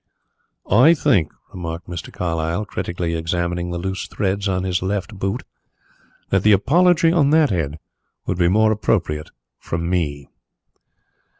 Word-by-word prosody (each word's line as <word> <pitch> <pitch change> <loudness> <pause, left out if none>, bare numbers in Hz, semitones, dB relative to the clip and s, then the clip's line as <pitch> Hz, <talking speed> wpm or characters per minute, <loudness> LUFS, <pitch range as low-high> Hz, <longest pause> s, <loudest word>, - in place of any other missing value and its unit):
"I 130 - +6
think," 110 - +2 0.2
remarked 85 -2 -6
Mr. 85 -2 -7
Carlyle, 85 +3 -2
critically 85 -3 -3
examining 85 +1 -2
the 85 - -3
loose 95 +2 -4
threads 100 0 -1
on 95 -1 -1
his 90 -2 -1
left 100 +3 -2
boot, 95 +1 -2 0.9
"that 95 - +3
the 105 +2 +5
apology 165 - +4
on 155 -5 +3
that 155 -1 +4
head 80 -5 -2 0.5
would 90 - -2
be 85 - +4
more 110 +4 +4
appropriate 90 -8 -1 0.3
from 85 0 -3
me." 75 -6 -2
90 Hz, 135 wpm, -21 LUFS, 85-105 Hz, 0.9 s, I